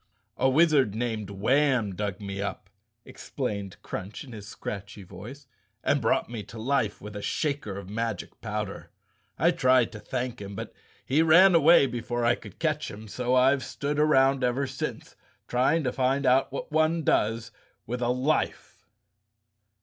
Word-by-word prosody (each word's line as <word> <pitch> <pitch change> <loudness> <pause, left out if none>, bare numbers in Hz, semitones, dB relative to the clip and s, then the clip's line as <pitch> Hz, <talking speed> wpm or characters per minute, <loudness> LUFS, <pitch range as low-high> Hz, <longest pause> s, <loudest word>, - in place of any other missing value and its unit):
"A 130 - +3
wizard 140 -7 +4
named 110 -3 -2
Warn 120 0 +1
dug 100 -1 -3
me 100 -1 -5
up," 100 -1 -5 0.3
explained 100 -2 -5
Crunch 100 +5 -6
in 135 - -12
his 105 -3 -9
scratchy 100 0 -7
voice, 105 +10 -11 0.4
"and 145 - +2
brought 115 - +1
me 115 -2 -6
to 115 - -11
life 115 -2 0
with 105 +1 -9
a 105 - -5
shaker 140 -7 -2
of 100 -2 -8
magic 115 +3 -4
powder. 105 -2 -5 0.5
I - - +4
tried 130 -2 +3
to 110 - -9
thank 125 +1 -4
him, 100 0 -7
but - - -6 0.3
he 145 +5 +3
ran 175 +4 +7
away 165 -2 +6
before 120 -1 -2
I 120 - +5
could - - -10
catch 155 -2 -1
him, 110 +2 -10
so 125 +4 -1
I've 130 +1 +4
stood 145 +1 -3
around 135 -3 +4
ever 125 +3 +1
since 130 0 -5 0.3
trying 140 +6 +2
to 125 - 0
find 135 +2 +1
out 130 +1 +3
what 140 - -6
one 155 +1 +2
does 115 -3 +1 0.3
with 125 +2 -4
a 120 - +1
life." 130 +5 -1
125 Hz, 165 wpm, -27 LUFS, 105-140 Hz, 0.5 s, ran